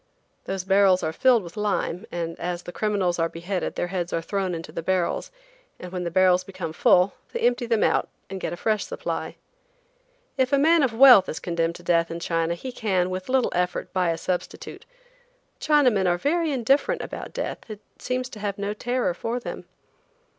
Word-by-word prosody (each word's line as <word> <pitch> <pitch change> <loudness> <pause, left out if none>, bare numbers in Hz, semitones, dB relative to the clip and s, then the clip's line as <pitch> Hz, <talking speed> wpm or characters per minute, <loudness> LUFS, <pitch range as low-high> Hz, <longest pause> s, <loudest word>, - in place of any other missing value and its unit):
Those 190 -1 -3
barrels 190 -1 +4
are 160 - -1
filled 245 +2 +4
with 170 - -11
lime, 205 -4 -2
and 165 -1 -3
as 175 0 -3
the - - -7
criminals 190 -3 0
are 165 0 +1
beheaded 180 +3 -4
their 175 - -2
heads 175 -2 -2
are - - 0
thrown 190 -1 -2
into 165 -1 -7
the 165 - -4
barrels, 180 0 -1 0.5
and 180 - -8
when 180 -1 -4
the - - -1
barrels 185 +1 +4
become 185 -4 -6
full 180 +4 +4 0.2
they - - -4
empty 240 0 +1
them 230 -2 +2
out - - +1 0.2
and 195 0 -6
get - - -3
a 175 - -5
fresh 215 +1 0
supply. - - -4 1.0
If 260 -1 +1
a 280 - +4
man 320 +3 +4
of 265 -4 +2
wealth 245 -6 +8
is 155 - -4
condemned 170 -1 -1
to 175 - -12
death 170 -1 +2
in 170 - -5
China 165 0 -1
he 255 +9 -7
can, 185 -6 0
with 185 +3 -5
little 260 -1 +2
effort, 180 0 -2
buy 180 -3 +1
a 165 - 0
substitute. 180 +1 -5 0.7
Chinamen 255 -11 +3
are 175 0 +2
very 320 - 0
indifferent 275 - +1
about - - -7
death; - - -4
it 215 -1 -8 0.2
seems 255 0 -2
to 215 - -10
have 200 -1 -3
no 200 +1 -2
terror 245 -2 -1
for 230 +7 -3
them. - - -7
190 Hz, 195 wpm, -24 LUFS, 175-235 Hz, 1.0 s, wealth